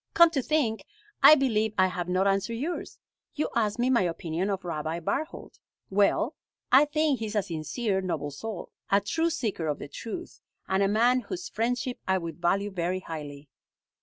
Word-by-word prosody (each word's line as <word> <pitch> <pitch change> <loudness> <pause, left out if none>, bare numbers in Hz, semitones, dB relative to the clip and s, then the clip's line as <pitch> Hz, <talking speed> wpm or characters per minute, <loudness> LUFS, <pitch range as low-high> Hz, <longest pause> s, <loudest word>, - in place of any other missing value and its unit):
Come 340 -1 +7
to 280 -5 0
think, 250 -6 0 0.4
I 310 - +10
believe 220 -6 +1
I 185 - +5
have 180 -1 -3
not 185 +2 +2
answered 195 +4 +1
yours. 310 +9 -4 0.4
You 305 - -1
asked 215 -2 +1
me 245 +2 +2
my 240 - +4
opinion 170 +1 -2
of 195 -2 -3
Rabbi 160 0 -3
Barthold. 290 - -4 0.3
Well, 205 +7 +2 0.4
I 270 +3 +7
think 295 -2 +1
he 225 - -3
is 210 - -6
a 205 - +2
sincere, 190 +5 -2
noble 170 -5 -3
soul, 205 +6 -6 0.2
a 200 - +5
true 325 +12 0
seeker 220 - -2
of 150 - -1
the - - -7
truth, 235 - -7 0.3
and 190 +1 +1
a 195 - +4
man 235 +5 +3
whose 355 +7 -6
friendship 245 +2 -1
I 190 0 +3
would 170 -1 -6
value 195 +4 +1
very 180 0 -2
highly." 150 -4 -7
205 Hz, 185 wpm, -28 LUFS, 180-255 Hz, 0.4 s, I